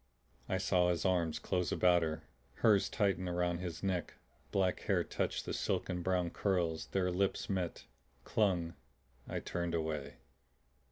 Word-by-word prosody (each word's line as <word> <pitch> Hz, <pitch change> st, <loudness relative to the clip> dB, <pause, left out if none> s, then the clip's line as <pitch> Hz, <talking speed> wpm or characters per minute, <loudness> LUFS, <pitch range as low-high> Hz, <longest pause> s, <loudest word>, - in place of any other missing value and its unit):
I -, -, +1 dB
saw 90 Hz, -1 st, +3 dB
his 85 Hz, +1 st, 0 dB
arms 85 Hz, -4 st, +2 dB
close 90 Hz, -3 st, -1 dB
about 90 Hz, -1 st, +4 dB
her, 80 Hz, -1 st, -2 dB, 0.3 s
hers 105 Hz, -3 st, +4 dB
tighten 95 Hz, -4 st, +1 dB
around 90 Hz, -1 st, 0 dB
his 90 Hz, -2 st, -5 dB
neck; 90 Hz, -4 st, -1 dB, 0.3 s
black 95 Hz, -2 st, +1 dB
hair -, -, +1 dB
touched -, -, -2 dB
the -, -, -3 dB
silken 90 Hz, -1 st, -1 dB
brown 90 Hz, -1 st, +1 dB
curls, 85 Hz, -5 st, 0 dB
their 90 Hz, -2 st, 0 dB
lips 95 Hz, +2 st, 0 dB
met, 90 Hz, -3 st, -2 dB, 0.4 s
clung. 90 Hz, -, +1 dB, 0.6 s
I -, -, -2 dB
turned 85 Hz, -1 st, -2 dB
away. 75 Hz, -3 st, -2 dB
90 Hz, 145 wpm, -34 LUFS, 85-95 Hz, 0.6 s, about